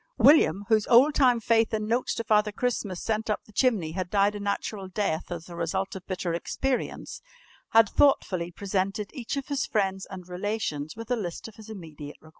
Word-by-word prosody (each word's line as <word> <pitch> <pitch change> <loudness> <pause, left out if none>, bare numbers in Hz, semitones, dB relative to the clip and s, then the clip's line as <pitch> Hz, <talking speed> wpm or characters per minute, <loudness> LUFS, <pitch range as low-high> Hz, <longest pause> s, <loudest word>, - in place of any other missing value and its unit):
William, 220 - +5
whose 215 -2 +2
old 260 +5 +6
time 250 -5 +4
faith 225 0 +2
in 215 0 -2
notes 235 +3 0
to 230 - -3
Father 210 -1 +2
Christmas 205 -5 -2
sent 220 0 -1
up 210 - -1
the - - -18
chimney 210 -9 +1
had 180 +1 -4
died 200 +1 +3
a 205 - -6
natural 200 0 -3
death 185 -4 -2
as 170 -1 -5
the 175 - -10
result 180 +4 -2
of 185 - -9
bitter 180 -2 -2
experience, 255 +9 -3 0.5
had 225 -1 +6
thoughtfully 185 -10 +2
presented 195 +2 -2
each 265 -1 -4
of 275 +1 -5
his 280 -2 -1
friends 195 -3 -1
and 185 -2 -9
relations 180 -5 -3
with 230 +2 -8
a - - +4
list 180 -5 -5
of 225 - -12
his 220 0 -12
immediate 155 -8 -9
requirements. 155 - -17
205 Hz, 200 wpm, -27 LUFS, 180-225 Hz, 0.5 s, old